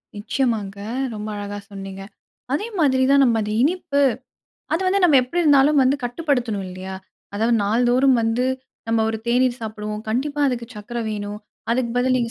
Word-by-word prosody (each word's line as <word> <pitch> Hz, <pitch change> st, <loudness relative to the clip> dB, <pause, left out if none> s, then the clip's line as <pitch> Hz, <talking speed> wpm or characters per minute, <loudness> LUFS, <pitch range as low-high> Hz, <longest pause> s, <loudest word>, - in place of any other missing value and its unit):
நிச்சியமாங்க. 210 Hz, -2 st, -1 dB, 0.4 s
ரொம்ப 210 Hz, 0 st, -5 dB
அழகா 205 Hz, 0 st, -5 dB
சொன்னீங்க. 195 Hz, -1 st, -7 dB, 0.5 s
அதே 405 Hz, +10 st, -1 dB
மாதிரி 260 Hz, -4 st, +3 dB
தான் 280 Hz, 0 st, +6 dB
நம்ம 235 Hz, -3 st, +3 dB
அந்த 210 Hz, 0 st, -3 dB
இனிப்பு. 290 Hz, -1 st, +1 dB, 0.7 s
அது 325 Hz, -, +1 dB
வந்து 390 Hz, +2 st, +2 dB
நம்ம 310 Hz, -5 st, +6 dB
எப்டி 255 Hz, +8 st, -4 dB
இருந்தாலும் 290 Hz, -1 st, +5 dB
வந்து 260 Hz, +2 st, +3 dB
கட்டுப்படுத்தணும் 245 Hz, -, -1 dB
இல்லியா? 185 Hz, +1 st, -7 dB, 0.4 s
அதாது 225 Hz, +3 st, +1 dB
நாள்தோறும் 245 Hz, +5 st, +3 dB
வந்து, 225 Hz, +2 st, +1 dB, 0.4 s
நம்ம 225 Hz, 0 st, +2 dB
ஒரு 220 Hz, 0 st, -2 dB
தேநீர் 250 Hz, +1 st, +2 dB
சாப்டுவோம், 210 Hz, -1 st, -5 dB
கண்டிப்பா 285 Hz, +6 st, -1 dB
அதுக்கு 245 Hz, -3 st, -2 dB
சக்கர 215 Hz, +3 st, -6 dB
வேணும், 205 Hz, -1 st, -4 dB, 0.3 s
அதுக்கு 235 Hz, 0 st, +1 dB
பதில் 255 Hz, +1 st, +3 dB
நீங்க 235 Hz, -2 st, -1 dB
240 Hz, 155 wpm, -22 LUFS, 210-275 Hz, 0.7 s, தான்